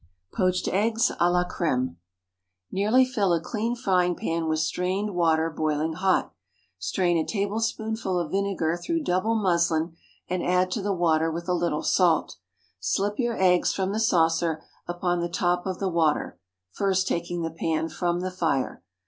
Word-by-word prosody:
POACHED 185 -1 +1
EGGS 225 +5 +2
À 175 +1 +4
LA 180 0 +2
CRÈME. 130 -8 0
✠ - - -18 0.8
Nearly 215 +7 +3
fill 205 -8 +1
a 170 - +2
clean 225 +7 -2
frying 180 -7 +1
pan 165 0 -2
with 155 0 +1
strained 185 +6 -1
water 165 -2 +2
boiling 155 +1 -1
hot; 185 +3 +1 0.5
strain 170 - +1
a - - +1
tablespoonful 220 0 -2
of 165 -3 -3
vinegar 190 -4 0
through 325 - -2
double 215 +2 +1
muslin, 170 -5 +1 0.3
and 185 -1 -1
add 180 +1 +2
to 210 - -1
the 200 +1 -1
water 165 -3 +2
with 170 +2 -5
a 180 - +1
little 170 -3 0
salt. 175 - +2 0.4
Slip 200 - -1
your 240 -2 0
eggs 180 -2 +3
from 190 0 -1
the 215 - -1
saucer 165 -5 +2 0.2
upon 175 0 -1
the 170 0 -2
top 175 +1 0
of 185 -1 -2
the 195 - -1
water 160 - 0 0.3
(first 190 - 0
taking 170 0 -2
the 165 - -2
pan 160 0 -1
from 175 +1 -1
the 185 0 -3
fire.) 165 -8 -1
180 Hz, 165 wpm, -26 LUFS, 165-195 Hz, 0.8 s, À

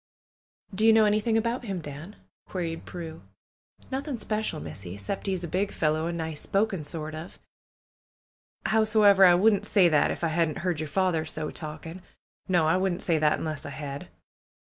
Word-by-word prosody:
"Do 205 +3 -1
you 225 - +8
know 220 -1 +6
anything 215 +2 +2
about 235 +2 -1
him, 195 -4 -3
Dan?" 155 +6 -8 0.3
queried 170 -3 -4
Prue. 165 -2 -7 0.7
"Nothing 270 0 -3
speshul. 215 0 -2
Missy; 90 +4 -8
'cept 190 - -4
he's 190 -2 -1
a - - -3
big 190 +5 -1
fellow, 155 +1 0
an' 170 0 -3
nice 160 -2 -4
spoken 195 -4 0
sort 155 +1 -5
of. 160 +3 -8 1.3
Howsomever, 215 -3 +5
I 180 -2 +8
wouldn't 205 +2 +3
say 190 -5 +5
that, 150 -2 +3
if - - -4
I 165 - +2
hadn't 160 -1 0
heerd 180 -4 0
yer 155 - -3
father 170 +1 +1
so 155 -1 -4
talking. 160 +3 -7 0.5
No; 175 -4 +3
I 165 +3 +3
wouldn't 185 -1 0
say 165 -3 +2
that 150 -1 +3
unless 155 -2 -4
I - - -6
had." 140 -1 -6
175 Hz, 175 wpm, -27 LUFS, 155-205 Hz, 1.3 s, you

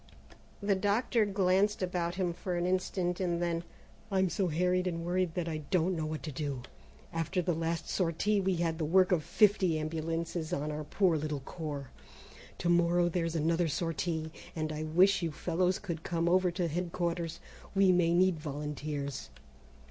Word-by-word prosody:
The 200 0 +3
doctor 210 +4 +2
glanced 195 +1 +2
about 175 -1 -1
him 180 -2 0
for 180 +1 -4
an 175 0 0
instant, 180 -1 0
and 175 -2 0
then: 170 -1 -1 0.5
"I'm 190 -1 +2
so 195 - +1
harried 180 +3 +1
and 165 -1 -3
worried 180 -1 0
that 175 -2 -1
I 160 -2 -2
don't 180 0 +2
know 160 -2 -2
what 155 0 -4
to 155 - -4
do. 140 -3 -3 0.5
After 165 +3 -1
the 175 0 +1
last 165 +1 -2
sortie 195 +4 +1
we 190 -1 +1
had 165 -1 -1
the - - 0
work 185 +4 +4
of 170 -4 +2
fifty 190 -1 +3
ambulances 165 +2 -3
on 150 -1 -1
our 150 0 -4
poor 175 +1 +2
little 150 -2 -3
corps. 145 -2 -6 0.7
To - - -2
morrow 175 0 +4
there's 165 -1 -1
another 165 +2 +2
sortie, 160 0 -2 0.2
and 155 -1 -2
I 155 - -4
wish 180 +6 +4
you 165 -2 -1
fellows 180 +4 0
could 170 -6 -5
come 170 0 -1
over 185 +1 +4
to 175 0 -1
headquarters. 170 0 -2 0.4
We 195 -1 +5
may 175 -2 +3
need 180 -1 +3
volunteers. 145 -1 -4
170 Hz, 170 wpm, -31 LUFS, 160-185 Hz, 0.7 s, We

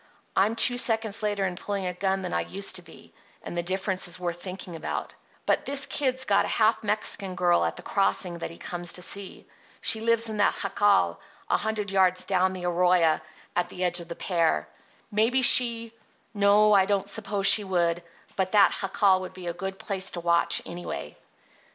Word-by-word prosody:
I'm 210 +4 +2
two 245 +1 +4
seconds 220 -3 +1
later 205 -2 -1
in 180 -1 -3
pulling 200 +1 -4
a 180 - -2
gun 190 +1 -2
than 180 - -5
I - - 0
used 195 0 -1
to - - -8
be, 170 -2 -17 0.3
and - - -7
the 175 - -1
difference 185 +1 -2
is 175 +1 -5
worth 175 -1 -4
thinking 185 -2 -7
about. 160 - -5 0.3
But - - 0
this 280 +1 +3
Kid's 260 -2 0
got - - +2
a - - -4
half 220 0 +1
Mexican 205 -2 -1
girl 175 -2 +2
at - - -2
the 175 - -11
Crossing 180 -3 0
that - - -5
he 165 - -12
comes 175 -1 -5
to 180 - -1
see. 200 +1 -4 0.3
She 220 - +2
lives 230 0 +3
in 215 -1 -3
that 205 - +2
jacal 200 - +1 0.3
a - - +3
hundred 215 -2 -3
yards 185 -1 +2
down 185 -1 +1
the 180 -1 -6
arroyo 175 -2 +2 0.3
at 175 0 -1
the 180 - -6
edge 180 0 +1
of 170 - -10
the 170 - -7
pear. 165 - 0 0.4
Maybe 230 +5 +2
she—no, 225 -3 +3
I 195 -2 +5
don't 200 -1 -1
suppose 200 -1 -3
she 210 - +6
would, 175 -3 0 0.3
but 190 0 -2
that 205 -2 +5
jacal 195 -1 +2
would 185 - -8
be 185 -1 -10
a 170 - -3
good 190 +2 -6
place 195 -1 -1
to - - -2
watch, 170 0 +1
anyway." 120 - -7
190 Hz, 195 wpm, -26 LUFS, 180-210 Hz, 0.4 s, she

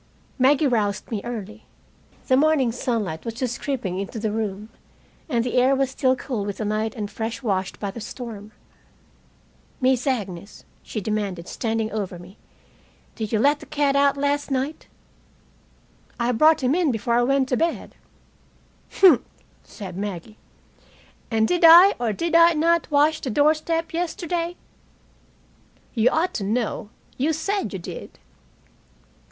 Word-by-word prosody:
Maggie 275 +4 +4
roused 210 -6 0
me 215 -3 -2
early. 220 -2 -7 0.6
The 260 - +4
morning 280 -3 +3
sunlight 225 -9 -3
was 230 -1 -5
just 240 -1 -3
creeping 215 -10 -3
into 200 +4 -5
the 215 -1 -2
room, 210 -1 -4 0.6
and 235 -5 +1
the 245 - -3
air 260 +2 +4
was 270 -1 0
still 260 -1 +2
cool 250 -5 -4
with 200 -1 -4
the 215 - -3
night 215 +2 -1
and 210 -3 -4
fresh 225 +4 -5
washed 195 -4 -2
by 200 -2 -3
the 230 - -9
storm. 220 -2 -8 1.3
"Miss 255 0 +1
Agnes," 200 -7 -4 0.2
she 215 - -5
demanded, 200 -4 -3
standing 225 -2 -2
over 200 -4 -4
me, 175 +4 -14 0.7
"did 215 -2 -5
you 220 - +2
let 285 +6 +3
the 295 - -12
cat 285 -1 +1
out 280 0 +3
last 285 +1 0
night?" 270 +3 -3 1.3
"I 240 +1 +1
brought 310 +4 +4
him 255 +2 +2
in 345 -2 +2
before 235 +1 -2
I 240 - +4
went 265 +1 +2
to 255 - +1
bed." 335 0 -2 1.0
"Humph!" 360 -10 +6 0.4
said 190 -4 -9
Maggie. 205 +1 -6 0.9
"And 220 -1 +2
did 355 -1 0
I 345 +4 +9
or 235 -2 0
did 335 +11 -3
I 335 0 +7
not 335 +2 +1
wash 300 +1 +3
the 265 - -3
doorstep 310 +5 +1
yesterday?" 345 0 -2 1.4
"You 235 0 +3
ought 330 +6 0
to 205 - -3
know. 215 0 -2 0.3
You 300 +5 +1
said 390 - -2
you 195 - -4
did." 175 - -9
245 Hz, 150 wpm, -23 LUFS, 215-290 Hz, 1.4 s, I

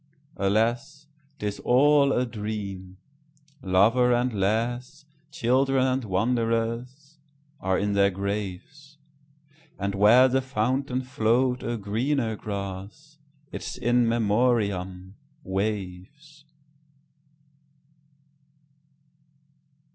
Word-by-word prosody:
Alas! 120 +8 0 0.3
't - - -6
is 105 -1 -3
all 140 +2 +4
a 125 -1 +1
dream. 105 -5 -6 0.6
Lover 110 +6 +3
and 120 0 +1
lass, 120 +8 -2 0.2
Children 130 0 +1
and 130 -1 0
wanderers, 115 +7 -2 0.4
are 95 0 0
in 105 0 -1
their 100 0 +4
graves; 100 - -6 0.8
And 100 0 -2
where 110 +6 +6
the 130 +1 +1
fountain 130 +1 -1
flow'd 125 +1 +1
a 120 0 -3
greener 115 +3 -1
grass—Its 140 +11 -8
In 120 0 +2
Memoriam—waves. 105 - -2
115 Hz, 80 wpm, -25 LUFS, 100-130 Hz, 0.8 s, where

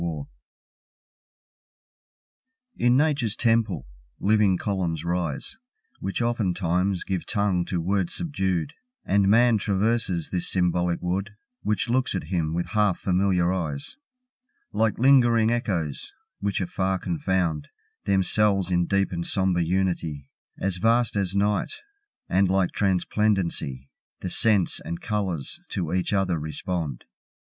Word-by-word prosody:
Echoes 80 -4 -3 2.5
In 120 +1 +3
Nature's 140 -7 +1
temple, 115 - +1 0.3
living 105 -2 +3
columns 85 -6 -2
rise, 85 - -3 0.4
Which 100 +5 -2
oftentimes 95 -5 0
give 95 -2 -3
tongue 100 -5 +1
to 90 - -2
words 95 +1 -1
subdued, 95 - -2 0.3
And 100 -1 +3
Man 115 +1 +5
traverses 100 -3 0
this 90 -2 0
symbolic 90 -1 0
wood, 95 +4 -2 0.3
Which 105 +3 0
looks 125 -2 +1
at 95 - -2
him 80 -2 0
with 85 - -2
half 105 -4 +2
familiar 90 -1 +1
eyes, 75 -7 -4 0.8
Like 110 -1 +1
lingering 120 -4 +5
echoes, 90 - -2 0.3
which 100 -1 -1
afar 95 +1 -1
confound 85 -3 -1 0.4
Themselves 100 -1 +2
in 90 -1 +2
deep 100 0 +1
and 85 -2 -3
sombre 95 -1 +1
unity, 85 -5 -1 0.3
As 95 -2 -1
vast 115 +4 +2
as 100 -1 0
Night, 105 - +1 0.5
and 95 0 +2
like 95 -1 +2
transplendency, 95 -8 0 0.3
The 90 - -4
scents 105 -5 +2
and 85 - -6
colours 95 -9 -3
to 85 -4 -2
each 90 -1 0
other 95 -4 +1
respond. 75 -1 -4
95 Hz, 120 wpm, -25 LUFS, 85-105 Hz, 2.5 s, Man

